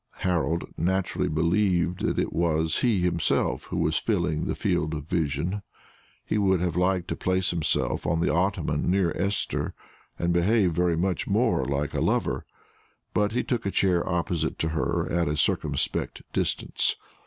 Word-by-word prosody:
Harold 85 -2 0
naturally 95 +2 0
believed 90 +2 +1
that - - -1
it - - -1
was 80 -1 +1
he 115 -7 +2
himself 85 -2 +1
who - - -4
was 80 0 +1
filling 85 -8 0
the - - -2
field 80 +1 0
of 75 -2 -5
vision. 85 +3 -1 0.6
He 105 - 0
would 95 -3 +3
have 85 -2 -1
liked 90 0 +1
to - - -1
place 95 0 0
himself 85 -3 0
on 85 - +1
the 85 - +1
ottoman 85 -4 0
near 90 -2 +2
Esther, 100 +1 -1 0.4
and 85 0 0
behave 95 +2 +3
very 85 0 +1
much 90 +1 -1
more - - +2
like 70 0 -1
a - - -1
lover; - - 0 0.7
but 105 +1 +1
he 125 - +1
took 120 -3 -1
a 100 - -1
chair 90 -3 +2
opposite 85 -2 -1
to 80 - -1
her 80 -1 -1
at 85 0 +1
a 75 +1 -1
circumspect 75 - 0
distance. - - 0
85 Hz, 165 wpm, -26 LUFS, 80-95 Hz, 0.7 s, would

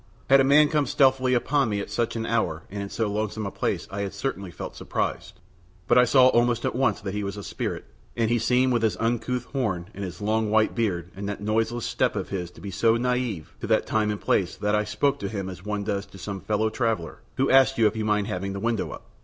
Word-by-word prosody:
Had 135 - +8
a - - +5
man 145 +3 +6
come 150 -2 +1
stealthily 130 -1 +3
upon 135 +1 +1
me 100 -1 -1
at 100 - -6
such 120 -1 -1
an 115 0 -2
hour 100 -9 -1
and 100 0 -4
in 100 - -5
so 110 - -1
lonesome 105 +1 -2
a 100 - -3
place - - -2
I 100 +1 -3
had 100 0 -4
certainly 100 -3 -3
felt - - -7
surprised; - - -3 0.5
but - - +4
I 125 - +6
saw 130 +1 +6
almost 120 -1 +2
at - - 0
once 130 +2 +1
that 95 -2 -4
he 105 0 -2
was 100 +1 -4
a 100 - -6
spirit, - - -4 0.3
and 115 -1 +1
he 120 - +3
seemed 125 +2 +2
with 120 - +1
his 110 -5 +1
uncouth 120 +2 -1
horn 100 -10 -1
and 100 - -6
his 90 -2 -6
long 110 +1 0
white 110 0 +3
beard 90 -7 -1
and 100 +1 -4
that 105 - -4
noiseless 115 +2 0
step - - 0
of - - -3
his 90 -3 -3
to - - -16
be 100 - -6
so 115 +5 +3
native 125 -8 -2
to - - -4
that - - +2
time 110 -1 +1
and 105 -1 -2
place 90 -3 +1
that 105 0 -1
I 105 0 +2
spoke 140 +7 0
to 100 - -3
him 100 -3 -4
as 90 -1 -11
one 105 0 -2
does 100 -1 -2
to - - -14
some 95 0 -6
fellow 110 +1 0
traveller 110 -10 -2 0.2
who 135 - +2
asks 135 0 +5
you 115 - +4
if 105 - +2
you 110 - -2
mind 105 -1 +1
having 100 -2 -3
the 100 - -4
window 115 -1 -1
up. - - -9
110 Hz, 255 wpm, -25 LUFS, 100-120 Hz, 0.5 s, Had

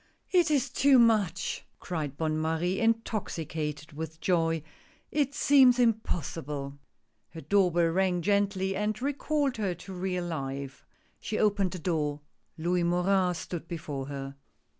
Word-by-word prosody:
" - - -46
It 350 -3 +4
is 280 -3 +1
too 275 -1 +5
much! 220 -7 +2
" - - -43
cried 150 -5 -4
Bonne 155 0 0
Marie, 165 +4 0
intoxicated 165 -9 -2
with 160 +1 -6
joy; 165 -4 +1 0.2
" - - -33
it 280 0 -1
seems 265 -3 +6
impossible! 155 - -1 0.2
" - - -47
Her 160 - -6
door 195 -1 +3
bell 170 0 +3
rang 180 0 +1
gently 200 -1 +1
and 210 +1 -1
recalled 285 0 0
her 195 -5 -1
to 190 +3 -10
real 180 -1 -2
life. 140 -4 -5 0.3
She 215 - -3
opened 205 -3 +2
the - - -4
door. 150 -4 -1 0.4
Louis 175 +2 0
Morin 180 +1 +2
stood 170 0 -6
before 150 -5 -5
her. 140 -1 -6
180 Hz, 150 wpm, -29 LUFS, 160-210 Hz, 0.4 s, seems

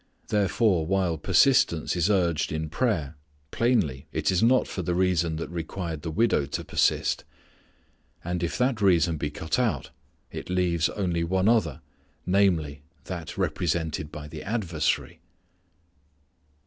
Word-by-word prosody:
Therefore 100 -3 +2
while 95 -3 +1
persistence 95 - +3
is 90 +2 +1
urged 85 -6 +1
in 80 0 -3
prayer 80 - -1 0.4
plainly 90 - 0
it - - 0
is 90 - +1
not 125 +3 +4
for 95 - -4
the 90 0 -1
reason 85 -3 +1
that 80 - -4
required 85 -1 -4
the 80 - -4
widow 80 -5 +1
to 70 - -4
persist. - - +1 1.0
And 90 0 -3
if 85 - -2
that 125 -3 +1
reason 85 -4 +3
be 75 0 -2
cut 80 +9 -2
out 120 -4 -1 0.4
it - - -7
leaves 90 -2 +1
only 90 -4 -1
one 95 +3 +1
other, 105 - +2 0.4
namely, 90 -7 +1 0.2
that 85 -4 -7
represented 80 -3 -1
by 75 0 -8
the 75 0 -8
adversary. 90 -8 -1
85 Hz, 135 wpm, -26 LUFS, 80-100 Hz, 1.0 s, not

